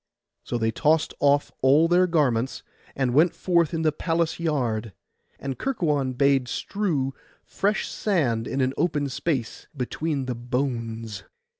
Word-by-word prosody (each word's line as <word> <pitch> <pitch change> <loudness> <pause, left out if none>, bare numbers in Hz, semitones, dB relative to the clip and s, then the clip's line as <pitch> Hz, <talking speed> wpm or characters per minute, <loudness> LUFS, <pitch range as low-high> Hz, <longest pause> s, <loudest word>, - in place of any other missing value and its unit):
So 120 - -2
they 110 -1 +1
tossed 155 +7 +2
off 145 0 +3
all 145 +5 +5
their 180 +2 +4
garments, 135 -7 +1 0.3
and 130 -3 0
went 160 +5 +4
forth 170 -4 +2
in 165 -1 -2
the 155 - +3
palace 165 +2 -1
yard; 120 - -1 0.4
and 135 -2 -5
Kerkuon 150 - 0
bade 135 -1 +3
strew 150 -5 -1 0.3
fresh 205 +2 0
sand 130 - 0
in 135 - -1
an 130 0 +1
open 150 -3 0
space 130 -3 -3
between 140 +2 -2
the 125 - -2
bones. 115 -3 -3
140 Hz, 140 wpm, -25 LUFS, 125-165 Hz, 0.4 s, all